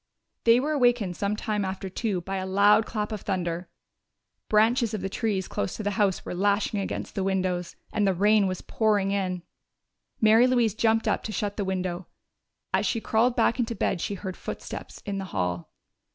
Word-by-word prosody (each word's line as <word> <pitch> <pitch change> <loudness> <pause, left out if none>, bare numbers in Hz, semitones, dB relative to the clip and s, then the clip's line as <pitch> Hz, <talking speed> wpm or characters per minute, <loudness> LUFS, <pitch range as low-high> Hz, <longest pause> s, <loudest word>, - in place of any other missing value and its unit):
They 230 +1 +6
were 295 +4 -1
awakened 245 -10 +2
sometime 210 +1 -1
after 190 0 -4
two 190 -1 -2
by 195 +3 -4
a 185 - -3
loud 205 +3 +4
clap 210 -1 -3
of 215 -3 -4
thunder. 175 -2 -2 0.8
Branches 225 +1 +3
of 205 - -4
the 195 - -2
trees 205 -5 -1
close 100 - -3
to - - -5
the 205 - 0
house 195 -2 +1
were - - -4
lashing 200 +2 +1
against 195 - -4
the 195 - -1
windows, 185 -2 -1 0.2
and 205 -2 +2
the 190 - +2
rain 205 +2 +4
was 185 -1 -3
pouring 205 -3 +1
in. 185 -3 -1 0.8
Mary 220 +3 +6
Louise 240 -5 +2
jumped 225 0 +2
up - - +1
to 220 - -3
shut 205 0 -2
the 205 - -1
window. 185 -1 -3 0.7
As - - +2
she 230 - 0
crawled 230 +3 +2
back 245 - +2
into 235 -1 -1
bed 190 -3 0
she 200 - -2
heard 185 -1 -6
footsteps - - -7
in 200 -1 -3
the 195 - -4
hall. 90 -2 -2
200 Hz, 190 wpm, -26 LUFS, 190-220 Hz, 0.8 s, They